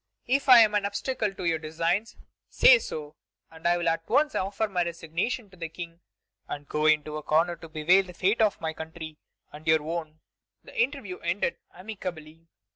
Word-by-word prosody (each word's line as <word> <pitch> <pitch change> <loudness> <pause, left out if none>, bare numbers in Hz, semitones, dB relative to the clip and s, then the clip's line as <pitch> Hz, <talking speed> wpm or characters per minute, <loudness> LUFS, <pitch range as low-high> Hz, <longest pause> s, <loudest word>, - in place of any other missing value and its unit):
If 270 +2 0
I 245 -2 +10
am 215 -2 +4
an 205 -1 +1
obstacle 210 +2 -2
to 185 - -6
your 165 -1 +1
designs, 165 +7 -1 0.3
say - - +7
so, 150 - -7 0.4
and 160 +1 -4
I 175 0 +3
will 175 - -2
at 165 0 -1
once 295 +4 +3
offer 200 +3 -1
my 180 -3 0
resignation 170 +8 -3
to 185 - -17
the 165 -1 -5
King, 170 0 -9 0.5
and 145 0 -6
go 150 0 0
into 155 0 +2
a - - -5
corner 165 +4 +2
to 165 - -12
bewail 160 +5 +4
the 180 -1 -12
fate 200 +7 +1
of 215 -3 +2
my 160 -1 -3
country 160 -1 -8 0.3
and 155 +2 -12
your 160 -1 +4
own." 160 -1 -5 0.4
The - - -14
interview 265 - -2
ended 170 +1 -1
amicably. 170 -5 -8
170 Hz, 190 wpm, -27 LUFS, 160-205 Hz, 0.5 s, I